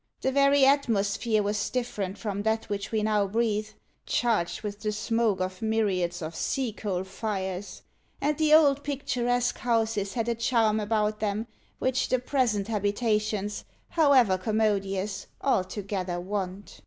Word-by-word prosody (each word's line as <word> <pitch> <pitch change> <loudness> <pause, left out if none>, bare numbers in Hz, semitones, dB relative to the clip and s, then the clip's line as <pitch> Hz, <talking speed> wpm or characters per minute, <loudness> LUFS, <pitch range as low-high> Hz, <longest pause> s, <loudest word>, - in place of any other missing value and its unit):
The 265 - +1
very 280 0 +5
atmosphere 225 -5 +2
was 205 0 -1
different 210 -6 -3
from 205 -3 -3
that 220 +1 -1
which 200 -1 -3
we 220 -2 0
now 210 -2 +2
breathe, 215 0 0 0.4
charged 220 -6 0
with 205 -1 -5
the 215 0 -1
smoke 220 -1 0
of 185 0 -3
myriads 195 -6 0
of 160 +1 -5
sea 260 -5 -1
coal 190 -4 -3
fires; 190 -1 -4 0.4
and 300 +1 +1
the 310 -1 +3
old 290 -2 +6
picturesque 245 -3 -1
houses 225 -4 0
had 230 -1 -1
a 235 - +2
charm 230 -2 +2
about 215 0 0
them, 210 +1 -1 0.3
which 260 0 0
the 255 - +3
present 245 -6 0
habitations, 210 -1 -1 0.3
however 260 - +4
commodious, 200 -2 -1 0.2
altogether 190 -6 -1
want." 190 +1 -5
215 Hz, 140 wpm, -27 LUFS, 200-235 Hz, 0.4 s, old